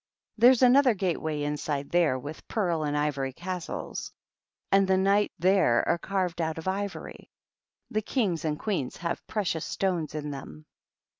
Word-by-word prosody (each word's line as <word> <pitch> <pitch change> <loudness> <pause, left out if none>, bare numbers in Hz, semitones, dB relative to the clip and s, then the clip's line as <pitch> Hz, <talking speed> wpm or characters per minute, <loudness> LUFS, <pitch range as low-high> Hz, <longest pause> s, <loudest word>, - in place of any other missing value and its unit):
There's 245 +2 +6
another 255 -1 +6
gate 185 -3 -1
way 155 -2 -2
inside 145 -1 -3
there, 170 -7 +3
with 145 +4 -9
pearl 175 -7 0
and 145 0 -1
ivory 140 -3 -1
castles; 180 +3 -5 0.6
and 195 0 +5
the 190 0 +3
Knights 200 +2 +2
there 185 -9 +3
are 170 - +2
carved 180 -2 -2
out 160 0 -2
of 160 - -7
ivory. 200 +1 -4 0.6
The 215 -2 0
Kings 205 - -1
and 150 -2 -1
Queens 180 - -2
have 170 +1 -4
precious 185 -7 -1
stones 175 -6 -2
in 150 -1 -4
them." 80 - -9
175 Hz, 155 wpm, -28 LUFS, 150-195 Hz, 0.6 s, There's